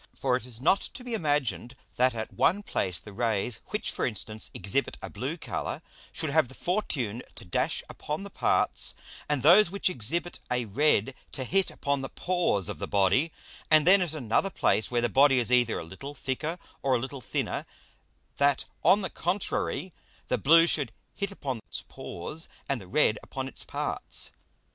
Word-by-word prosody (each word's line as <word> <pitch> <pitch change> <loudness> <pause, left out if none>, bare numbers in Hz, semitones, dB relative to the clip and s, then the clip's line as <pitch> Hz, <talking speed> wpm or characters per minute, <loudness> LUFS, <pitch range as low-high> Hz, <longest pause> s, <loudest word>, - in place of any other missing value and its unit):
For 130 -2 +1
it 125 -1 -3
is 115 -3 -6
not 190 +9 +4
to 250 - -6
be 245 -1 -5
imagined 145 - 0 0.2
that 125 -1 +3
at 110 -1 -4
one 205 +4 +2
place 90 - -1
the 105 - -12
Rays 110 +1 -1
which, 210 - -2
for - - -3
instance, 110 -2 -2
exhibit 100 +9 -1
a - - -7
blue - - -3
Colour, - - -4 0.3
should 155 - -2
have 155 -3 +4
the 130 - -12
fortune 130 - -1
to - - -9
dash 90 - 0
upon 150 +6 -5
the 200 - -8
parts, - - +1 0.3
and 145 -4 +1
those 175 +5 +8
which 195 0 0
exhibit 170 +8 -1
a 125 -1 0
red 135 +1 +2 0.2
to 130 - -3
hit 190 +8 +1
upon 140 -1 -1
the 135 - -4
Pores 175 - +1
of - - -4
the - - -3
Body; 100 - +3 0.4
and 155 -1 +6
then 190 +2 +7
at 165 -3 -1
another 135 - +1
place, 110 - +2
where 120 -1 +1
the 120 - +3
Body 135 +3 +5
is 120 -1 +2
either 125 -2 +4
a - - -4
little 135 - -8
thicker 150 +6 -3 0.2
or 135 -2 +2
a - - +1
little 130 +2 -5
thinner, - - -2 0.7
that 140 -1 +3 0.2
on 205 - +6
the 190 - -2
contrary 185 0 -1 0.4
the 125 - +1
blue 165 +8 +7
should 145 -8 0 0.2
hit 200 -1 -3
upon 135 -11 -4
its - - -4
pores, 150 - -6 0.2
and 135 -5 -1
the 95 - -11
red 110 -1 +3
upon 135 0 -5
its - - -5
parts. - - -3
135 Hz, 185 wpm, -28 LUFS, 120-165 Hz, 0.7 s, those